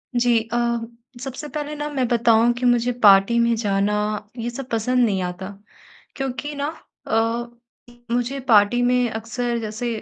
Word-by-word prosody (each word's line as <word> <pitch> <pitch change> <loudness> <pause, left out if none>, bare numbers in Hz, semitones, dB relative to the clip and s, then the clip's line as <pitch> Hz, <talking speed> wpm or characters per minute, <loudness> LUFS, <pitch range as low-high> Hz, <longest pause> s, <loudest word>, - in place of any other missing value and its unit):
जी, 240 -1 +3
अ, - - +1 0.6
सबसे 270 +3 -6
पहले 300 0 -5
ना 295 0 -4
मैं 265 -4 -1
बताऊँ 235 0 +4
कि 245 +1 -4
मुझे 245 0 +3
पार्टी 195 +3 +6
में 235 0 +3
जाना 205 -2 0 0.4
ये 235 0 -3
सब 250 +2 -7
पसंद 245 +2 +1
नहीं 195 -4 0
आता। 180 +1 -5 0.7
क्योंकि 270 +2 -4
ना, 285 0 -2 0.4
अ, 235 +2 -3 0.2
मुझे 245 +3 -1
पार्टी 215 +2 +5
में 245 0 +2
अक्सर 235 +2 -3
जैसे 220 +2 -4
240 Hz, 150 wpm, -22 LUFS, 225-250 Hz, 0.7 s, पार्टी